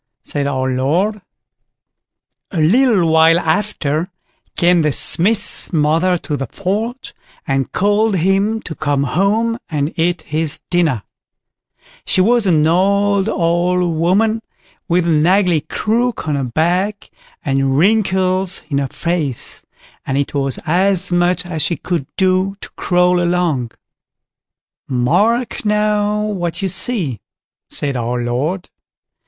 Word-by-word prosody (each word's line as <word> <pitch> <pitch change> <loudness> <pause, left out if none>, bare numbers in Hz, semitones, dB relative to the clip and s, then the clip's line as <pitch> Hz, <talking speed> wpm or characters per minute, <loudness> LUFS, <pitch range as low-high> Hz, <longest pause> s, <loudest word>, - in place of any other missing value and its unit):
said 140 -1 -2
our 130 -2 -1
Lord. 170 +12 0 1.3
A 175 - -3
little 200 +2 +3
while 160 +1 +5
after 165 -3 -1 0.5
came 175 0 +4
the 150 -1 +1
Smith's 205 - +1
mother 165 +3 +2
to 155 -3 -4
the 135 -2 -4
forge, 215 - -4 0.3
and 135 -1 -1
called 205 +2 +1
him 195 +5 +1
to 165 - -6
come 145 -3 -1
home 210 - 0
and 150 -1 -2
eat 175 +2 0
his 155 0 -2
dinner; 160 - +1 1.0
she - - 0
was 225 +2 +3
an 155 -4 +3
old, 200 +4 +2
old 175 -1 +1
woman 210 +7 +1 0.5
with 175 -1 +1
an 160 -1 +2
ugly 180 -4 +3
crook 230 +3 -1
on 150 - 0
her 140 -2 -1
back, 180 - -1 0.3
and 135 -1 +1
wrinkles 190 -1 +1
in 140 - +1
her 140 - -1
face, 155 -3 -3 0.4
and 135 - -2
it 140 - -2
was 135 -2 -1
as 185 +2 +1
much 175 +1 +1
as 165 -3 -3
she 170 +2 0
could 165 -3 -3
do 190 +1 +1
to - - -8
crawl 180 0 +1
along. 170 -8 0 1.2
"Mark 200 - +1
now, 210 0 +1
what 180 -4 -3
you 190 - 0
see", 170 - -1 0.5
said 140 -2 -2
our 120 0 -2
Lord. 145 +10 -2
175 Hz, 125 wpm, -17 LUFS, 150-200 Hz, 1.3 s, while